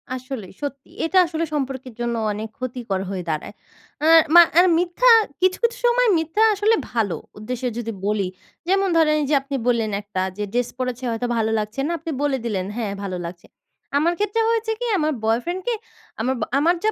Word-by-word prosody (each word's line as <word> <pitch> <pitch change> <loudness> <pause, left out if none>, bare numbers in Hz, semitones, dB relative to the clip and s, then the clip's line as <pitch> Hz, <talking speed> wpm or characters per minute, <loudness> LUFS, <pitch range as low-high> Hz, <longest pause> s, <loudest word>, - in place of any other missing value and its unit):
আসলেই 255 -7 -7
সত্যি। 280 -2 -6 0.2
এটা 375 +3 +1
আসলে 330 0 -2
সম্পর্কের 265 -3 -3
জন্য 235 0 -1 0.2
অনেক 215 +2 -5
ক্ষতিকর 240 -6 -3
হয়ে 185 -2 -4
দাঁড়ায়। 155 -1 -3 0.5
অ্যা 315 - +3 0.3
মা 345 - +12 0.2
আর 365 - +7
মিথ্যা 355 +8 +3 0.3
কিছু, 370 0 +3
কিছু 470 +1 +2
সময় 485 -1 +4
মিথ্যা 325 +7 +1
আসলে 425 +3 +3 0.2
ভালো 220 -6 0 0.2
উদ্দেশ্যে 250 +3 -3
যদি 230 -1 -3 0.2
বলি। 205 -3 0 0.4
যেমন 390 +1 +2
ধরেন 305 -2 +4
এই - - 0
যে 295 - +4
আপনি 275 0 -5
বললেন 225 -3 +1
একটা 200 -2 -4 0.2
যে 210 - -2
dress 245 -1 0
পড়েছে 255 0 -3
হয়তো 230 +2 -2
ভালো 220 0 +1
লাগছে 215 +5 -5
না, - - -1
আপনি 325 - -5
বলে 275 -2 +1
দিলেন 190 -5 -1
"হ্যাঁ 210 -4 -2
ভালো 185 -2 -3
লাগছে।" 170 0 -9 0.5
আমার 335 +4 +2
ক্ষেত্রে 420 +2 +1
হয়েছে 450 -1 0
কি? - - -2
আমার 310 -1 +1
boyfriend 290 +12 0
কে 480 - +2 0.5
আমাবা 245 -2 -1
আমার 335 +5 +3
যা 435 - +3
260 Hz, 190 wpm, -22 LUFS, 220-345 Hz, 0.5 s, মা